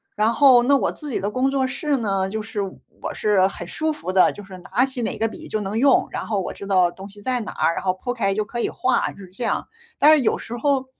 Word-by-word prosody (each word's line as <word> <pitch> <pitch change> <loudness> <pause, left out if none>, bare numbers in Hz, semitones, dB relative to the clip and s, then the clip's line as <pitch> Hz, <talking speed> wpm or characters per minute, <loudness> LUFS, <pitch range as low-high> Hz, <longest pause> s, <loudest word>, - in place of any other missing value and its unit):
然 215 +1 +2
后， 260 -2 +6
那 280 +3 +4
我 - - 0
自 300 - -7
己 255 - -1
的 205 +2 -2
工 260 +3 +1
作 270 -1 +1
室 285 +2 -1
呢， 195 -5 -1
就 215 +1 -4
是 210 -2 -4
我 195 -1 -7
是 200 -3 +3
很 195 - -7
舒 315 0 -1
服 240 -11 -5
的， 185 - +5
就 205 - -10
是 190 -1 -11
拿 240 +8 +1
起 260 -2 -5
哪 230 - -2
个 225 - +1
笔 - - -9
就 215 - -2
能 205 +2 -3
用， 270 +3 +4
然 - - -4
后 205 -3 0
我 - - -5
知 200 - -9
道 185 -3 +3
东 195 +2 -10
西 205 +1 -14
在 250 +3 0
哪 220 - -5
儿， 165 - +1
然 - - -4
后 185 - +2
铺 245 +6 -4
开 195 -5 0
就 215 - -1
可 240 +3 -5
以 - - 0
画， 260 - +1
就 - - -16
是 195 - -11
这 215 +6 -6
样。 - - -1 0.3
但 300 +2 +7
是 305 - +4
有 - - +2
时 235 - -7
候， 270 +1 +1
220 Hz, 305 characters per minute, -22 LUFS, 195-260 Hz, 0.3 s, 但